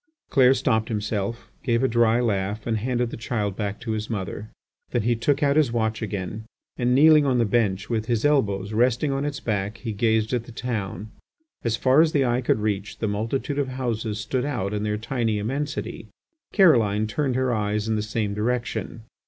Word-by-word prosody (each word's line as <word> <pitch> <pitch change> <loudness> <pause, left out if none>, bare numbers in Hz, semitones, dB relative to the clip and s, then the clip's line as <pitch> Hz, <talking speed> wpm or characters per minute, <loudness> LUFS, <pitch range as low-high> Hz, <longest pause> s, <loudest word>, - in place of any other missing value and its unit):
Clair 130 -2 +5
stopped 115 -4 +1
himself, 105 +1 -3
gave 115 0 +1
a - - +4
dry 120 -1 +3
laugh, 105 -2 -1
and 115 -1 0
handed 120 +1 -1
the - - -6
child 105 -4 -2
back 105 -1 -3
to 120 -2 -4
his 110 0 -3
mother. 105 0 -4 0.4
Then 120 - 0
he 120 +1 +2
took 140 +6 +1
out 140 +1 +3
his 150 -6 +3
watch 110 -1 -1
again, 105 0 -4 0.3
and 125 0 +1
kneeling 155 +2 +7
on 135 -3 +2
the 120 - +3
bench 105 -3 0
with 110 -2 -2
his 120 +1 0
elbows 105 -9 +1
resting 125 +5 +2
on 135 +1 -1
its 145 -1 -3
back 105 0 -2
he 115 -3 -5
gazed 110 +2 +1
at 120 -2 -1
the 120 - -11
town. 110 -4 -4 0.5
As 115 -1 +1
far 130 +5 +5
as 160 -1 +2
the 140 -2 +3
eye 120 +1 +1
could 115 -3 +1
reach, 105 -2 -2
the 110 - -2
multitude 115 +7 -2
of 140 - 0
houses 115 -5 -3
stood 125 +4 -2
out 105 -9 -2
in 105 - -1
their 105 0 -1
tiny 115 -1 -1
immensity. 140 +8 -3 0.4
Caroline 115 - +4
turned 130 +3 -1
her 130 -1 +1
eyes 105 0 -1
in 110 - +1
the 105 - 0
same 105 -1 -2
direction. 115 +1 -2
115 Hz, 200 wpm, -24 LUFS, 105-130 Hz, 0.5 s, kneeling